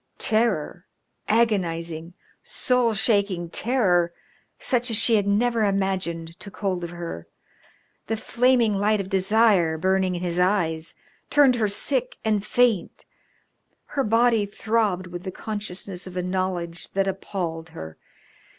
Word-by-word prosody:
Terror, 215 -6 0 0.4
agonising, 170 -7 0 0.3
soul 250 -3 +1
shaking 200 -5 +1
terror 185 -9 +2 0.5
such 250 -1 0
as 225 - +2
she 230 +1 +4
had 205 -2 +1
never 225 +2 +2
imagined, 185 -4 -1
took 200 - -11
hold 185 -4 -2
of 170 - -4
her. 170 - -7 0.8
The 225 - -1
flaming 240 -1 +2
light 210 +1 +2
of 195 -1 -5
desire 195 -4 +3
burning 185 +2 +1
in 175 - -4
his 175 0 -1
eyes 170 -4 0 0.3
turned 285 -3 +5
her 220 -2 +2
sick - - +1
and 210 -2 +1
faint. 225 -2 +1 0.8
Her 275 - -2
body 225 -1 +3
throbbed 210 -3 0
with 175 -1 -7
the 190 - -5
consciousness 195 -2 -5
of 185 0 -8
a 180 - -1
knowledge 180 -2 -3
that 195 0 +1
appalled 175 -4 -4
her. 80 - -9
195 Hz, 130 wpm, -24 LUFS, 175-220 Hz, 0.8 s, turned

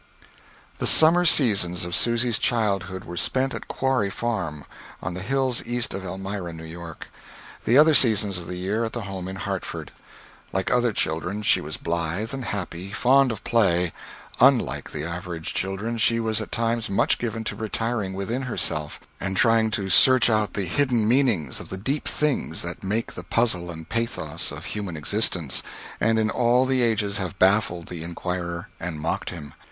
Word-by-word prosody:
The - - +1
summer 170 +3 +7
seasons 100 - +4
of 85 - -6
Susy's 120 -1 +2
childhood 100 -5 0
were 85 - -8
spent 130 +8 0
at - - -7
Quarry 130 -6 0
Farm, 95 -10 -3 0.3
on 90 - -5
the 90 - -6
hills 130 +3 0
east 120 0 -2
of 95 - -5
Elmira, 95 -1 -5
New 80 0 -9
York; 85 0 -9 0.6
the 120 - +4
other 155 +2 +7
seasons 105 -8 +4
of 85 - -9
the 90 - -5
year 100 +6 -2
at 110 - -4
the 120 - -4
home 95 -2 -6
in 95 - -6
Hartford. - - -5 0.6
Like 95 -1 -1
other 125 -1 +2
children, 90 +3 -2
she - - +4
was 75 +1 -5
blithe 85 +7 -3
and 135 -2 -5
happy, 95 -2 -5
fond 130 +3 +3
of 110 - -6
play; 90 -7 +2 0.5
unlike 130 -1 +3
the 75 - -5
average 85 -1 -5
of - - -4
children, 100 +5 -2
she 115 +1 +3
was 110 -1 0
at - - -7
times 115 0 0
much 100 - +2
given 115 -1 -3
to - - -3
retiring 110 -2 -2
within 110 +7 -3
herself, 75 - -2 0.2
and 95 -1 -3
trying 115 0 +4
to 100 -2 -1
search 130 +5 +6
out 110 -3 0
the 100 - -1
hidden 120 +2 +1
meanings 115 - +1
of - - -9
the 95 - -5
deep 135 +10 -2
things 145 - -1
that 85 0 -7
make 105 +4 -2
the - - -7
puzzle 90 -7 +1
and 80 -1 -8
pathos 115 +3 -2
of - - -8
human 100 -6 -5
existence, 85 -2 +1 0.4
and 115 0 +2
in 110 -1 +1
all 125 +1 +3
the 130 -1 +1
ages 105 -4 +1
have 95 0 -4
baffled 95 -3 +2
the 85 -2 -7
inquirer 85 0 -4
and 80 -3 -5
mocked 80 +2 -2
him. 75 -5 -9
100 Hz, 180 wpm, -24 LUFS, 90-115 Hz, 0.6 s, summer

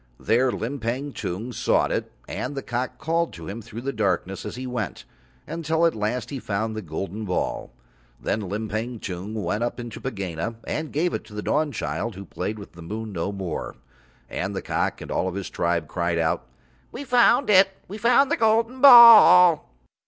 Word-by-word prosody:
There 125 +3 +2
Limpang 130 +3 -4
Tung 105 +8 -5
sought - - +1
it - - -2 0.2
and 145 - -4
the 135 - -4
cock 125 +1 -3
called 165 +4 -1
to 85 -2 -9
him 110 +4 -6
through 115 +1 -9
the 135 +2 -3
darkness 95 -3 -1
as - - -6
he 130 +1 -6
went, 120 - -4 0.4
until 160 +1 0
at 165 - +3
last 110 +5 -3
he 140 - -4
found 110 0 -3
the 110 - -4
golden 95 +5 -5
ball. 90 -3 -3 0.5
Then 110 - -2
Limpang 110 +3 -4
Tung 95 +3 -6
went 105 +1 -2
up 120 - -3
into 120 -2 -7
Pegāna 100 -3 -4
and 155 0 -4
gave 170 +4 0
it - - -3
to 105 -2 -13
the 105 - -4
Dawnchild, 115 - -2
who 100 +1 -9
played 110 +3 -4
with 100 - -11
the 85 - -13
moon 110 +5 -6
no 90 +3 -2
more. 95 -5 -5 0.5
And 95 +3 -4
the - - -4
cock - - -2
and - - -8
all 95 - 0
his 100 0 -5
tribe 85 -2 -1
cried 85 +1 -1
out: 80 -1 -1 0.4
"We 265 - -7
found 250 -1 +4
it. 195 0 +6 0.2
We 205 +4 -8
found 245 +5 +4
the - - +2
golden 230 +3 +1
ball." 220 - +9
115 Hz, 185 wpm, -24 LUFS, 100-155 Hz, 0.5 s, ball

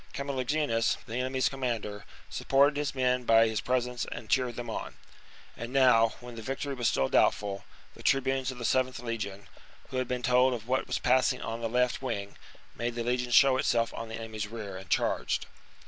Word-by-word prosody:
Camulogenus, 140 -3 0
the 115 - -5
enemy's 130 +1 +1
com 135 - -5
mander, 110 -5 -3 0.2
supported 140 +2 +3
his 145 -1 -2
men 125 -1 +1
by 115 -1 +5
his 110 -2 -1
presence 125 -1 -1
and 120 -2 -7
cheered 125 -3 +2
them 120 0 -5
on. 110 - -5 0.6
And 120 +1 -6
now, 125 -4 +5
when 120 -1 -9
victory 135 +5 -4
was 120 -3 0
still 65 -8 +2
doubtful, 100 -1 +1 0.3
the - - -13
tribunes 135 -1 +1
of 130 - -6
the 120 - -6
7th 130 0 0
legion, 105 -4 -4 0.4
who 130 - -4
had 130 -1 0
been 125 -1 -3
told 125 0 +4
of 115 -1 -9
what 130 +1 0
was - - -1
passing 130 0 +2
on 115 +1 -4
the 115 - -1
left 125 +2 +1
wing, 100 -6 -4 0.4
made 120 +1 -3
the 120 - -2
legion 125 +1 -1
show 135 +1 +6
itself 115 -2 +1
on 115 - -6
the 110 - -5
enemy's 110 -2 -5
rear, 105 -3 -7
and 95 0 -9
charged. - - 0
125 Hz, 195 wpm, -29 LUFS, 115-130 Hz, 0.6 s, show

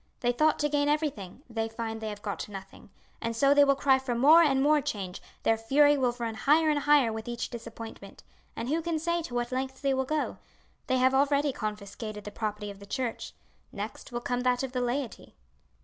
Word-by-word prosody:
They 245 - +2
thought 305 +5 +2
to 295 - +1
gain 290 0 +1
everything 285 - -2
they 225 -2 -3
find 225 0 -5
they 220 - -3
have 205 -1 -8
got 205 0 -4
nothing; 195 -1 -10 0.3
and 230 0 -2
so 275 +4 +4
they 285 0 +6
will 275 -1 +4
cry 270 -1 +3
for 260 -2 -3
more 300 +8 +7
and 275 -5 +3
more 295 +2 +4
change, 195 -7 -4 0.2
their 225 - +3
fury 290 +6 +4
will 255 -3 +1
run 230 -2 -3
higher 305 +7 +3
and 295 - +1
higher 285 -6 +4
with 220 +1 -6
each 240 0 -4
disappointment, 230 -1 -9 0.3
and 230 - -4
who 315 +5 0
can 335 -1 -1
say 340 +2 0
to 250 -6 -7
what 240 0 -1
lengths 265 +1 -3
they 275 -1 +2
will 265 0 0
go? 305 +2 -2 0.5
They 260 - +2
have 260 +1 +3
already 280 +1 +2
confiscated 210 0 -5
the 210 - -7
property 210 -1 -4
of 200 - -13
the 200 - -12
church, 245 +1 -3 0.4
next - - -7
will 240 0 -3
come 245 0 -1
that 250 0 +1
of 265 - -3
the 250 -1 -2
laity." 245 +1 -3
250 Hz, 215 wpm, -28 LUFS, 225-285 Hz, 0.5 s, more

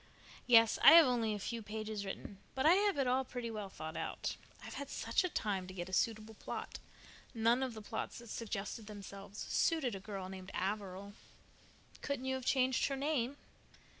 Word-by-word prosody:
"Yes, 230 -2 +6
I 295 - +11
have 335 -1 +10
only 230 -4 +1
a - - -5
few 230 +3 -4
pages 215 -1 -4
written, 195 0 -7 0.2
but 265 +1 0
I 320 - +8
have 400 -2 +3
it 275 - +2
all 255 +1 +2
pretty 245 -2 -5
well 210 -3 -5
thought 160 -3 -7
out. - - -3 0.3
I've - - -7
had 280 -1 -6
such - - 0
a 365 - 0
time 195 - -2
to 185 - -9
get 175 0 -5
a - - -10
suitable 220 +1 0
plot. - - -6 0.6
None 230 +3 +3
of 255 -3 -2
the 215 - -8
plots - - -4
that 235 -1 -11
suggested 215 -1 -4
themselves 200 -1 -9
suited 305 -4 +1
a 195 - -4
girl 195 -1 -6
named 190 0 -8
Averil." 200 0 -3 0.9
"Couldn't 280 -2 -3
you 265 - 0
have 260 -1 -4
changed 260 -1 +3
her 275 - -2
name?" 275 -2 -1
225 Hz, 195 wpm, -35 LUFS, 200-260 Hz, 0.9 s, I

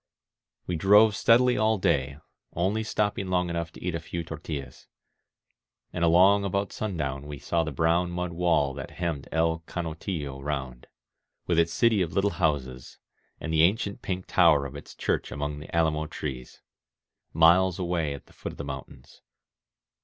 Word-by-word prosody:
We 90 - -2
drove 105 +4 +6
steadily 125 +4 +4
all 110 0 +2
day, 70 -7 0 0.4
only 95 +6 0
stopping 105 -2 -1
long 90 -1 0
enough 85 -1 -3
to - - -12
eat 90 -1 -2
a 85 - -2
few 85 +1 -5
tortUlaa. 75 -5 -7 1.1
And 85 - -2
along 95 +4 +5
about 100 0 -2
sundown 75 -9 -3
we 75 -1 -6
saw 85 +4 0
the 80 - -4
brown 85 +5 +1
mud 90 0 -3
wall 85 -5 +1
that - - -7
henmied 85 -6 -3
El 80 0 +1
Canotillo 80 -4 -4
round, 65 -4 -4 0.6
with 85 -2 +2
its 85 0 +2
city 110 +3 +3
of 85 -2 -2
little 100 +3 +2
houses, 65 -6 -1 0.4
and 80 - -4
the 80 - +4
ancient 100 +3 +1
pink 95 -1 -4
tower 80 -6 +4
of 70 - -7
its - - -10
church - - -2
among 75 0 -4
the 75 - -8
alamo 80 -2 +1
trees, 65 -6 -7 0.4
— - - -65 0.2
miles 85 +3 +4
away 85 -5 -1
at 70 - -12
the - - -22
foot - - -7
of - - -14
the - - -5
mountains. 65 -2 -9
85 Hz, 170 wpm, -27 LUFS, 75-95 Hz, 1.1 s, drove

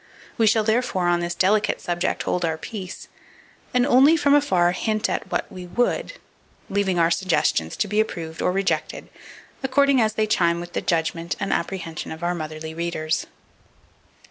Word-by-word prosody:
We 225 - +3
shall, 220 +1 +4
therefore, 220 -5 +1
on 175 0 +3
this 175 0 -3
delicate 205 +4 +2
subject 175 +1 -2
hold 180 - -1
our 160 -1 0
peace; 190 +1 -7 0.6
and 250 -1 +3
only, 280 +4 +6
from 285 -2 +3
afar, 185 -12 +3
hint 215 +4 -1
"at - - -4
what - - 0
we 180 -1 -8
would," 245 - 0 0.6
leaving 195 -2 +1
our 165 0 +3
suggestions 155 - +1
to - - 0
be 210 +2 0
approved 165 -7 -2
or - - +2
rejected, 195 +1 -2 0.5
according 275 0 +3
as 215 -1 +1
they 215 0 +1
chime 170 -5 +2
with 175 0 -8
the - - -1
judgment 165 0 -1
and 195 - -2
the - - +3
apprehension 170 -4 -4
of 160 +2 -8
our 175 +1 +1
motherly 155 -1 -6
readers. 160 -1 -2
185 Hz, 170 wpm, -23 LUFS, 170-220 Hz, 0.6 s, only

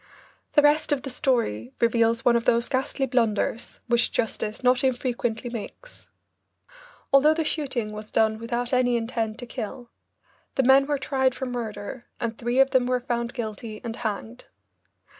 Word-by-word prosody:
The 295 - +5
rest 295 +1 +3
of 285 -3 +1
the 270 - -5
story 180 - 0
reveals 230 0 +2
one 240 - +5
of 235 - +1
those 235 0 +3
ghastly 270 0 0
blunders 230 -2 -1
which 240 0 +2
justice 220 0 -2
not 250 +1 +3
infrequently 245 -2 -1
makes. 245 - -9 1.1
Although 300 +3 +6
the 325 - 0
shooting 270 -8 -2
was 215 0 -8
done 220 0 +2
without 240 +2 -3
any 245 -1 +3
intent 225 -1 -2
to 245 - -7
kill, 240 0 -7 0.6
the 265 - +2
men 270 +2 +6
were 295 -1 +1
tried 265 -1 0
for 265 - -4
murder 240 0 -5
and 230 -1 -2
three 240 +2 -2
of 270 0 +5
them 255 -2 +3
were 250 0 +1
found 240 0 -3
guilty 220 -2 -5
and 230 -1 -5
hanged. 200 - -5
240 Hz, 160 wpm, -25 LUFS, 225-265 Hz, 1.1 s, Although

